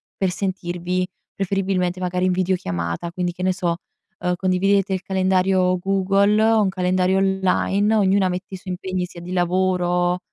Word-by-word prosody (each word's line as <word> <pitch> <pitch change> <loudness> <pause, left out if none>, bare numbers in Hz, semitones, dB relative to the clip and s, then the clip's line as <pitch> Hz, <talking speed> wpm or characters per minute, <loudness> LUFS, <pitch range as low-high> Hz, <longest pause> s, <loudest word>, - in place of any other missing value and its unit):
per 190 -2 0
sentirvi, 180 -1 -2 0.3
preferibilmente 185 -2 -1
magari, 180 0 -1
in 185 - +2
videochiamata. 170 - -2
Quindi, 180 -1 -2
che 180 - -9
ne 185 0 +2
so, 175 -2 -1 0.4
uhm, 180 0 0
condividete 190 +2 +1
il 185 - -2
calendario 185 -1 +2
Google, 195 +2 +2
un 220 -3 +3
calendario 185 0 +1
online, 195 +2 +1
ognuna 195 -2 +3
mette 180 +2 -5
i - - -4
suoi 185 0 -6
impegni 185 -1 -3
sia 175 - -11
di 180 +1 -8
lavoro, 180 0 +1
185 Hz, 150 wpm, -22 LUFS, 180-190 Hz, 0.4 s, un